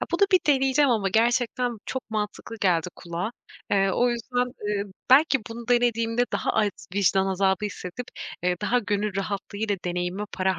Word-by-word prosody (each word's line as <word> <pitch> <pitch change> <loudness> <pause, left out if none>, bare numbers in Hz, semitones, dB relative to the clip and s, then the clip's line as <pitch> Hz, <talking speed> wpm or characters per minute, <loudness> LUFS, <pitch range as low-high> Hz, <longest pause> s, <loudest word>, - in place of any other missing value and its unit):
Ya, - - -2
bunu 370 +4 +4
bir 370 - +6
deneyeceğim 270 0 +4
ama 210 -4 +2
gerçekten 240 +2 +1
çok 260 -4 -5
mantıklı 215 +1 -4
geldi 180 -3 +2
kulağa. 175 +5 -4 0.4
Eee, 195 -1 +3
o 245 +1 +3
yüzden, 240 +1 -3
ııı, 210 -5 -2 0.2
belki 280 +1 +6
bunu 235 +1 -8
denediğimde 240 -1 +2
daha - - 0
az 210 -2 +2 0.2
vicdan 195 -1 +3
azabı 190 +1 +1
hissedip, 205 +4 -6 0.4
eee, 180 0 +1
daha 245 +4 +2
gönül 205 -2 -1
rahatlığıyla 200 +1 -2
deneyimime 180 +3 -2
para 190 0 0
210 Hz, 160 wpm, -25 LUFS, 195-245 Hz, 0.4 s, bir